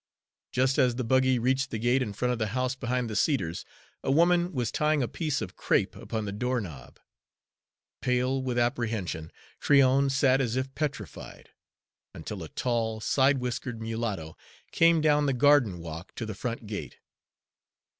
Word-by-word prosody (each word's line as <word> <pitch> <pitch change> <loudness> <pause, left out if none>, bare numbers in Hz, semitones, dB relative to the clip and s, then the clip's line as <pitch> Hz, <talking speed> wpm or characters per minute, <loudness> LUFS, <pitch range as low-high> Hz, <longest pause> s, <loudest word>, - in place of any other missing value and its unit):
Just 130 +1 +2
as 125 -2 +3
the 130 - -2
buggy 130 +2 +3
reached 130 +3 +1
the - - -3
gate 120 +4 +2
in 110 - -2
front 125 +5 -1
of 120 - -2
the 110 - 0
house 130 +1 0
behind 125 -2 -2
the 110 - -5
cedars, 95 - 0 0.4
a - - -2
woman 175 +4 +3
was 125 -8 -2
tying 150 -2 +1
a - - -1
piece 155 -2 -2
of - - -8
crape - - +1
upon 110 -2 -4
the 100 - -3
door 125 +5 -1
knob. 75 - -9 1.0
Pale 125 +1 +1
with 125 -2 -2
apprehension, 110 -9 -1 0.3
Tryon 140 -1 +4
sat 135 0 +3
as 120 -3 -1
if 130 +1 -2
petrified, 150 -1 -6 0.6
until - - -6
a - - -7
tall, 115 -3 -1
side 135 +5 +3
whiskered 125 -1 -4
mulatto 110 -8 -4 0.4
came 165 -1 +4
down 150 -1 +3
the 135 - +2
garden 130 -7 +4
walk 80 +1 -8
to 115 - -4
the 110 - -5
front 115 +3 -5
gate. 100 - -6
125 Hz, 165 wpm, -28 LUFS, 110-135 Hz, 1.0 s, Tryon